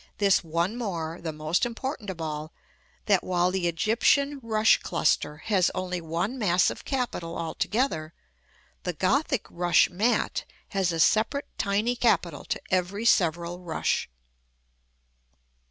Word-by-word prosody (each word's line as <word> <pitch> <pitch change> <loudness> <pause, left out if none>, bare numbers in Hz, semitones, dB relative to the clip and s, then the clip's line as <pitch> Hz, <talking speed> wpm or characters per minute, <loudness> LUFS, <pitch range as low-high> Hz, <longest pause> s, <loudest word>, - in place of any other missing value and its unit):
this 200 -2 +3
one 170 +6 -1
more 170 -8 -4
the 165 - -3
most 155 +3 -1
important 240 -2 -3
of 185 -3 -6
all 155 -1 -4 0.5
that 200 -3 +3
while 180 0 +1
the 185 -2 0
Egyptian 235 - +2
rush 220 -1 +3
cluster 150 - 0
has 185 +2 +2
only 180 -1 -3
one 170 +10 -2
massive 180 -4 +2
capital 240 -11 -3
altogether, 165 - -1 0.7
the 180 - -3
Gothic 260 - +1
rush 175 +1 +3
mat 215 +7 0 0.3
has 195 -3 0
a 165 - -3
separate 225 - +2
tiny 210 +4 +1
capital 180 -10 +1
to - - -2
every 190 +4 0
several 175 -4 +2
rush. 175 -3 -1
185 Hz, 125 wpm, -27 LUFS, 170-225 Hz, 0.7 s, this